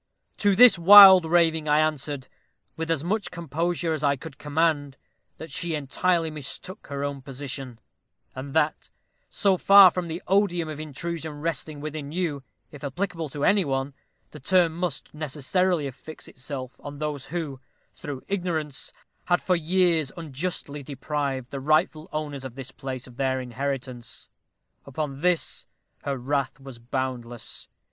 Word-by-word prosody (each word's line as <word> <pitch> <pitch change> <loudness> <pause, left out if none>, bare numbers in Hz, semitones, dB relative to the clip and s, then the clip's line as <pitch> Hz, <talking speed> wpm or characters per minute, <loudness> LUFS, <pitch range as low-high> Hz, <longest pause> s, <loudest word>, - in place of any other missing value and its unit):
To 205 -2 +3
this 240 -4 +8
wild 190 0 +10
raving 160 -2 +2
I 150 +1 +4
answered, 150 -3 -1 0.5
with 165 0 -4
as 160 -3 0
much 205 +4 -1
composure 170 +1 -2
as 155 - -3
I 140 -1 +3
could 140 +1 -11
command, 145 -2 0 0.4
that 160 -2 -9
she 165 +3 -2
entirely 160 +3 0
mistook 155 +6 -7
her 140 -1 -4
own 140 -1 -3
position, 135 -2 -7 0.6
and 135 +2 -7
that, 155 -1 +1 0.4
so 195 -3 +2
far 195 0 +8
from 180 -1 -3
the 165 +1 -4
odium 185 -4 +2
of 155 -1 -6
intrusion 160 +1 -5
resting 155 -2 -3
with 155 0 -5
you, 155 0 -3 0.3
if 145 -1 -12
applicable 165 +2 -3
to 145 +1 -2
any 200 -1 +4
one, 135 -1 -2 0.4
the - - -10
term 170 +2 +3
must 175 -4 -4
necessarily 155 +3 0
affix 140 +4 -9
itself 130 -1 -7
on 145 0 -8
those 150 -2 -4
who, 155 -5 -4 0.3
through 145 -5 -7
ignorance, 170 -7 -3 0.3
had 175 -1 +3
for 180 - +1
years 170 -3 +2
unjustly 150 -1 -4
deprived 140 -2 -3
the 140 - -4
rightful 155 +3 +1
owners 145 -3 -4
of 130 -2 -8
this 130 -1 -8
place 130 -2 -6
of 125 -1 -14
their 130 -1 0
inheritance. 130 -1 -5 0.5
Upon 140 0 -5
this 180 -1 0 0.4
her 140 -1 -2
wrath 135 +1 -2
was 135 -3 -10
boundless. 120 -1 -4
150 Hz, 150 wpm, -25 LUFS, 135-170 Hz, 0.6 s, wild